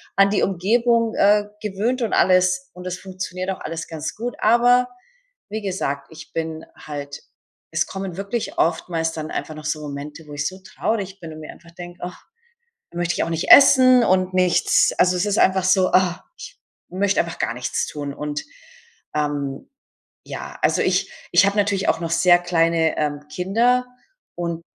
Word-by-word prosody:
an 195 0 +4
die 210 - +1
Umgebung, 230 +5 +1
äh, 205 +1 +4 0.2
gewöhnt 215 +5 -2
und 230 - -1
alles, 185 +9 +3
und 180 - -11
das 185 0 -4
funktioniert 185 0 -5
auch 190 - -7
alles 165 0 -5
ganz 160 -2 -5
gut. 240 +3 -5
Aber, 245 +2 +4 0.6
wie 220 +1 -4
gesagt, 140 -8 -3
ich 160 +1 -13
bin 160 -1 -4
halt 145 -1 -8 0.5
es - - 0
kommen 190 -2 -6
wirklich 200 +4 -4
oftmals 165 0 0
dann 155 -1 -5
einfach 155 - -4
noch 155 0 -10
so 150 0 -1
Momente, 145 +2 -7
wo 145 - -10
ich 145 0 -2
so 185 0 -7
traurig 195 0 -3
bin 165 -3 -9
und 155 - -10
mir 155 - -9
einfach 170 - -17
denke, 175 0 -10
ach, 180 0 -7 0.7
dann 170 - -10
möchte 170 0 0
ich - - 0
auch - - -3
nicht 165 0 -2
essen 255 -3 +8
und 185 -2 +2
nichts. 180 -1 +3
Also, 180 0 +3
es 180 - 0
ist 205 0 0
einfach 190 0 +3
so, 185 0 +3
ah, 180 -1 +2
ich - - -11 0.3
möchte 195 +2 +1
einfach 170 - -7
gar - - -1
nichts 125 0 -2
tun 145 -1 -5
und, 150 0 -4 0.7
ähm, 145 -2 -3 0.5
ja. - - -7
Also, - - +2
ich - - 0 0.2
ich - - +6
habe 200 +1 0
natürlich 200 -1 +1
auch - - +1
noch 165 -1 -4
sehr 175 +1 +5
kleine, 165 -2 +1
ähm, 150 -1 -2
Kinder 230 +10 +1 0.5
und 170 -1 -4
180 Hz, 180 wpm, -21 LUFS, 160-200 Hz, 0.7 s, essen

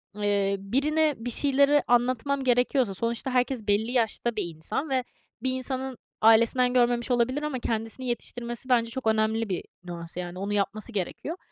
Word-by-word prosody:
eee, 200 -1 +1
birine 295 +8 +1
bir 245 +2 -4
şeyleri 280 +2 +4
anlatmam 255 +3 +1
gerekiyorsa 245 -3 +2
sonuçta 230 +5 -1
herkes 250 -3 0
belli 215 +4 +1
yaşta 235 -1 0
bir - - -1
insan 270 - -3
ve 260 -1 +1 0.4
bir 260 - +1
insanın 260 -1 -3 0.2
ailesinden 230 +3 +5
görmemiş 240 0 +2
olabilir 255 +5 +1
ama 280 -4 -2
kendisini 225 +3 -3
yetiştirmesi 240 +1 -4
bence 230 -2 +3
çok 260 -2 -4
önemli 220 0 +1
bir 180 - -2 0.2
nüans, 170 -1 -6
yani, 180 0 -5
onu 200 +1 -2
yapması 215 +3 -1
gerekiyor. 220 - -4
240 Hz, 155 wpm, -27 LUFS, 215-260 Hz, 0.4 s, ailesinden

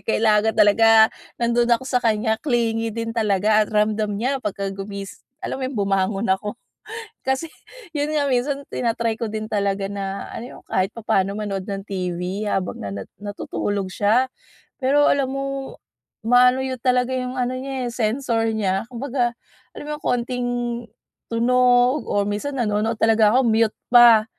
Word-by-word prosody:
kailangan 220 0 +2
talaga 220 +1 +6 0.3
nandun 235 0 +1
ako 235 +2 +2
sa 250 -2 0
kaniya. 220 0 +1
Clingy 230 -4 0
din 230 +1 -4
talaga 215 -1 +3
at - - -5
ramdam 210 -1 +1
niya 260 +2 -1
pagka 200 -1 -3
gumis 200 0 -7 0.2
alam 265 - -4
mo - - -2
‘yon, 265 - -7
bumangon 195 +1 0
ako. 205 +4 -3 0.7
Kasi 265 +5 -1 0.5
yun 295 +1 -1
nga 285 -2 +1
minsan 275 +3 0
tina-try 230 -1 -1
ko 235 - -3
din 215 0 -5
talaga 200 -1 -1
na 195 -1 -5
ano 245 +3 -8
yung - - -38
kahit 190 +2 0
papaano 200 -4 0
manood 200 -2 -4
ng 195 -1 -4
TV 185 +1 -3
habang 195 -3 -2
na 100 -1 -5
nat 100 -1 -7
natutulog 205 -1 -3
siya. 220 +7 +2 0.5
Pero 285 +3 +3
alam 275 -2 +1
mo, 275 0 -4 0.5
ma-ano 250 +2 +4
yu 260 -1 -2
talaga 250 0 +1
yung 255 0 -3
ano 250 0 0
niya 260 0 -4
eh, 240 - -4
sensor 230 0 0
niya. 195 +1 -1
Kumbaga, 245 -1 -2 0.4
alam - - -7
mo - - -6
yung - - -26
konting 245 0 -1 0.8
tunog 245 +2 +3
or 205 0 +1
minsan 210 +8 -3
nanonood 220 -1 0
talaga 220 +1 +4
ako, 265 - +4
mute 225 -1 +2 0.2
pa. 235 -3 +8
225 Hz, 160 wpm, -22 LUFS, 205-250 Hz, 0.8 s, pa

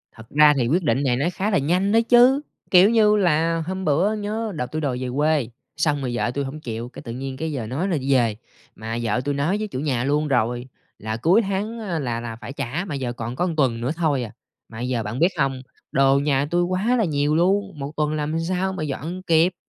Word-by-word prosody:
Thật 110 +1 -14
ra 150 0 +6
thì 120 -2 +1
quyết 175 +6 +1
định 140 -2 +1
này 125 -3 +2
nó 140 - 0
khá 205 +3 -1
là 195 - +3
nhanh 180 +8 +1
đó 225 - +5
chứ, 250 +3 +6 0.3
kiểu 185 +3 +7
như 215 -2 +4
là, 165 -3 +2
hôm 190 0 -3
bữa 170 +9 +2
nhớ 215 +1 -3
đợt 125 -5 -4
tui 155 0 -3
đòi 130 -4 -1
về 130 - -2
quê, 150 -4 +1 0.3
xong 150 -3 +1
rồi 125 -2 -2
vợ 120 - 0
tui 140 +2 -2
hổng 145 +3 -6
chịu, 120 -3 -5
cái - - -11
tự 115 - -7
nhiên 130 +2 -5
cái 160 +1 -3
giờ 120 -6 -4
nói 150 - -2
là 170 -5 0
đi 135 0 0
về, 115 -5 +2 0.4
mà 115 +1 -5
vợ 115 +2 0
tui 145 - 0
nói 155 +9 0
với 215 0 -3
chủ 130 - -5
nhà 130 -5 -1
luôn 150 +2 +1
rồi 120 -1 0 0.3
là 110 +1 -4
cuối 175 - +4
tháng 205 +3 -3
á 180 -7 -3
là 120 -4 -2
là 115 -1 -6
phải 120 +4 -9
trả, 145 +9 -3
mà 150 -6 -4
giờ 125 -3 -3
còn 120 +1 -5
có 175 - 0
1 165 -3 -2
tuần 125 -6 +1
nữa 125 +4 -1
thôi 150 -7 0
à. 110 - -7 0.4
Mà 110 - -10
bây 125 +2 -3
giờ 120 -3 -1
bạn 120 +6 -4
biết 170 - +5
không, 135 -2 0 0.3
đồ 135 0 +4
nhà 140 -1 +1
tui 175 0 +2
quá 190 +8 +1
là 220 - +2
nhiều 145 -1 +1
luôn, 195 0 +1
1 140 +2 -4
tuần 150 0 0
làm 155 +2 -1
sao 185 +3 -1
mà 165 -5 -4
dọn 160 +6 -4
kịp? 165 +2 +4
150 Hz, 255 wpm, -23 LUFS, 130-180 Hz, 0.4 s, kiểu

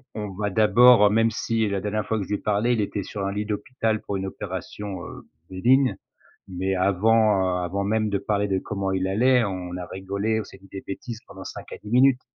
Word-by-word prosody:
on 105 -2 -4
va 105 0 -1
d'abord 110 +1 +6
même 115 +2 +3
si 110 -1 -1
la 100 -1 -1
dernière 105 +2 -2
fois 110 - -1
que 100 - -2
je - - -16
lui 105 - +1
ai - - -6
parlé, 105 +4 +1
il 110 - +1
était 100 -1 -3
sur 100 +1 -5
un 100 - -1
lit 105 +1 -3
d'hôpital 110 +1 -2
pour 100 - -3
une 95 - -3
opération, 95 +1 -6
heu, - - -10 0.3
bénigne, 125 +8 +3 0.5
mais 95 +1 -2
avant, 95 -1 +3
heu, - - -2
avant 100 +3 -2
même 110 +1 +1
de 100 -1 0
parler 105 +1 0
de 95 -1 +1
comment 95 -1 -3
il 95 0 0
allait, 125 +5 +3
on 90 -3 -4
a 90 -1 -6
rigolé, 100 +4 -2
on - - -5
s'est 95 - -14
dit 95 0 -19
des 95 - -6
bêtises 115 +4 -6
pendant 95 -1 -11
5 - - -8
à - - -5
10 105 - -9
minutes. 130 +1 +4
105 Hz, 235 wpm, -24 LUFS, 95-110 Hz, 0.5 s, d'abord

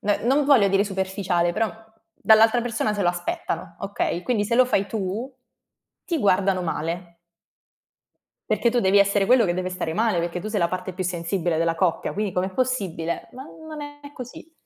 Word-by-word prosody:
n 205 0 +1
non 275 +4 +3
voglio 270 -8 +5
dire 195 +1 +3
superficiale, 190 -3 -1
però, 220 +4 0 0.4
dall'altra 220 +2 +5
persona 230 -3 -1
se 205 - -1
lo 175 - +3
aspettano, 175 -1 -3
okay, 185 -3 -2
quindi 225 -3 0
se 235 - 0
lo 255 +2 +6
fai 200 -5 0
tu, 215 +5 -3 0.7
ti 335 - -1
guardano 195 -4 +2
male. 170 +1 -4 1.3
Perché 235 - +2
tu 245 +1 +1
devi 195 0 +4
essere 200 0 +3
quello 245 +1 +5
che 175 -3 0
deve 185 0 -2
stare 180 -3 -3
male, 220 -2 +1
perché 170 +1 -2
tu 215 - -5
sei 215 - -1
la 170 - +3
parte 185 +1 -4
più 185 +1 -4
sensibile 175 -1 -1
della 165 0 +1
coppia, 170 0 0
quindi 205 -2 -2
com'è 185 +1 -1
possibile? 190 -9 -2
Ma 260 +2 -9
non 315 0 -10
è 290 0 -10
così. 255 +5 -10
195 Hz, 185 wpm, -24 LUFS, 180-235 Hz, 1.3 s, lo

